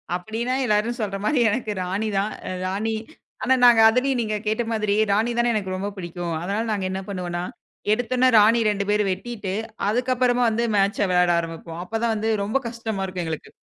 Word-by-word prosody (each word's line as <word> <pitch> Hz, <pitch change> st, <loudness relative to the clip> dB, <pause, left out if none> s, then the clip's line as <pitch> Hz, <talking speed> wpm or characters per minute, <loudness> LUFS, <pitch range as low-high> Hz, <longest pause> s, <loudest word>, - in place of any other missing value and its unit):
அப்படின்னா 225 Hz, +7 st, -3 dB
எல்லாரும 215 Hz, +2 st, +1 dB
சொல்ற 200 Hz, -2 st, -2 dB
மாரி 270 Hz, +4 st, +2 dB
எனக்கு 220 Hz, 0 st, -2 dB
ராணிதான், 200 Hz, +2 st, -1 dB, 0.3 s
ராணி 210 Hz, +4 st, -1 dB, 0.5 s
ஆனா 260 Hz, +1 st, +4 dB
நாங்க 235 Hz, -2 st, +7 dB
அதுலயு 255 Hz, +3 st, +1 dB
நீங்கக் 215 Hz, 0 st, -3 dB
கேட்ட 220 Hz, +3 st, +1 dB
மாதிரி 215 Hz, -2 st, 0 dB, 0.2 s
ராணிதானே 235 Hz, +3 st, +2 dB
எனக்கு 190 Hz, -3 st, -2 dB
ரொம்ப 195 Hz, +2 st, -3 dB
பிடிக்கும். 175 Hz, -1 st, -5 dB
அதனால 200 Hz, +6 st, -2 dB
நாங்க 200 Hz, -3 st, -1 dB
என்ன 190 Hz, -, -3 dB
பண்ணுவோம்னா 180 Hz, -3 st, -4 dB, 0.5 s
எடுத்தொனே 245 Hz, +3 st, +2 dB
ராணி 225 Hz, +3 st, +5 dB
2 200 Hz, -1 st, 0 dB
பேரும் 210 Hz, -1 st, +2 dB
வெட்டிட்டு 205 Hz, -1 st, -4 dB, 0.3 s
அதுக்கப்புறமா 250 Hz, +1 st, +1 dB
வந்து 225 Hz, +2 st, 0 dB
மேட்ச் 200 Hz, 0 st, +2 dB
வெளையாட 180 Hz, -1 st, +4 dB
ஆரம்பிப்போம். 165 Hz, 0 st, -6 dB
அப்பதா 225 Hz, +4 st, -1 dB
வந்து 220 Hz, +1 st, -1 dB, 0.2 s
ரொம்ப 235 Hz, +7 st, 0 dB
கஷ்டமா 225 Hz, -4 st, -4 dB
இருக்கும் 185 Hz, -2 st, -4 dB
எங்களுக்கு. 160 Hz, -2 st, -5 dB
210 Hz, 165 wpm, -23 LUFS, 190-235 Hz, 0.5 s, நாங்க